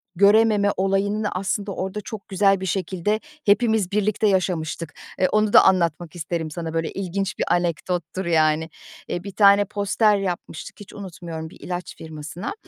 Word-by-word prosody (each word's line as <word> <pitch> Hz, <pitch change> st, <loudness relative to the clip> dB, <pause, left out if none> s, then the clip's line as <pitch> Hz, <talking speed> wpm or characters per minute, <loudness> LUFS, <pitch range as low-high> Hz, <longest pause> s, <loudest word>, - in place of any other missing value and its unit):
görememe 205 Hz, +1 st, +5 dB
olayını 200 Hz, +2 st, 0 dB
aslında, 195 Hz, +2 st, -2 dB
orda 190 Hz, +3 st, -4 dB
çok 210 Hz, 0 st, -8 dB
güzel 195 Hz, 0 st, +3 dB
bir -, -, -3 dB
şekilde 190 Hz, +3 st, -1 dB, 0.3 s
hepimiz 210 Hz, -2 st, +3 dB
birlikte 210 Hz, +1 st, +1 dB
yaşamıştık. 170 Hz, -4 st, -1 dB, 0.2 s
E, 185 Hz, -, +3 dB
onu 215 Hz, -1 st, +1 dB
da -, -, +9 dB
anlatmak 170 Hz, -2 st, +1 dB
isterim 160 Hz, -1 st, -3 dB
sana, 165 Hz, 0 st, -5 dB
böyle, 165 Hz, -1 st, -1 dB
ilginç 195 Hz, 0 st, -3 dB
bir -, -, +1 dB
anekdottur, 175 Hz, +1 st, -2 dB
yani. 160 Hz, -1 st, +2 dB, 0.4 s
Eee, 175 Hz, -, -3 dB
bir 200 Hz, -, -6 dB
tane 200 Hz, 0 st, +5 dB
poster 205 Hz, +1 st, +2 dB
yapmıştık, 180 Hz, -4 st, -5 dB
hiç 205 Hz, -, -12 dB
unutmuyorum, 170 Hz, -5 st, -7 dB
bir -, -, -16 dB
ilaç 180 Hz, 0 st, -5 dB
firmasına. 160 Hz, -, -6 dB
190 Hz, 150 wpm, -23 LUFS, 170-205 Hz, 0.4 s, da